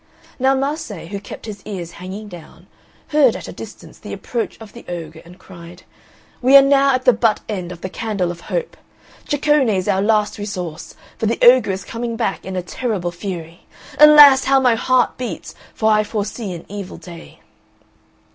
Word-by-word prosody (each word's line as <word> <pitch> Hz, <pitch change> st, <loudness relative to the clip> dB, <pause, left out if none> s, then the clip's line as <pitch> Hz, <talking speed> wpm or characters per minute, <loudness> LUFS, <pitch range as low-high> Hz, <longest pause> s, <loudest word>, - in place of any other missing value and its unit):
Now 265 Hz, +1 st, +3 dB
Mase, 270 Hz, -, -4 dB
who 200 Hz, -, -4 dB
kept 205 Hz, -, -10 dB
his 210 Hz, -3 st, -8 dB
ears 185 Hz, -5 st, -6 dB
hanging 190 Hz, +5 st, -8 dB
down, 175 Hz, -5 st, -13 dB, 0.4 s
heard 290 Hz, -6 st, +4 dB
at -, -, -7 dB
a -, -, -7 dB
distance -, -, -11 dB
the -, -, -8 dB
approach 235 Hz, -2 st, -4 dB
of 220 Hz, -2 st, -12 dB
the 235 Hz, -, -12 dB
ogre 160 Hz, -2 st, -7 dB
and 175 Hz, +2 st, -15 dB
cried, 175 Hz, -1 st, -13 dB, 0.6 s
"We 265 Hz, +3 st, +7 dB
are -, -, +9 dB
now 275 Hz, -1 st, +4 dB
at 255 Hz, -, -4 dB
the 250 Hz, -, +6 dB
butt 225 Hz, -3 st, +1 dB
end 185 Hz, -5 st, -5 dB
of 175 Hz, -1 st, -10 dB
the 185 Hz, -, -5 dB
Candle 200 Hz, -4 st, -2 dB
of 170 Hz, -1 st, -10 dB
Hope. 485 Hz, -, -4 dB, 0.5 s
Ceccone 290 Hz, -3 st, +2 dB
is 190 Hz, -3 st, -1 dB
our 190 Hz, -, +1 dB
last 210 Hz, 0 st, +1 dB
resource, 180 Hz, -6 st, -6 dB, 0.2 s
for 220 Hz, -, 0 dB
the 230 Hz, -, 0 dB
ogre 245 Hz, -3 st, +6 dB
is 190 Hz, 0 st, -3 dB
coming 230 Hz, 0 st, -4 dB
back 225 Hz, -6 st, -3 dB
in 190 Hz, 0 st, -5 dB
a 180 Hz, -, -2 dB
terrible 195 Hz, -3 st, -3 dB
fury. 170 Hz, -2 st, -8 dB, 0.3 s
Alas! 295 Hz, -3 st, +8 dB
how 270 Hz, 0 st, +4 dB
my 250 Hz, -3 st, +3 dB
heart 250 Hz, +2 st, +1 dB
beats, 250 Hz, -, -6 dB, 0.2 s
for 220 Hz, 0 st, +2 dB
I 215 Hz, 0 st, +3 dB
foresee 210 Hz, 0 st, -4 dB
an 170 Hz, -, -9 dB
evil 200 Hz, -1 st, -7 dB
day." 170 Hz, -2 st, -13 dB
210 Hz, 185 wpm, -19 LUFS, 180-255 Hz, 0.6 s, are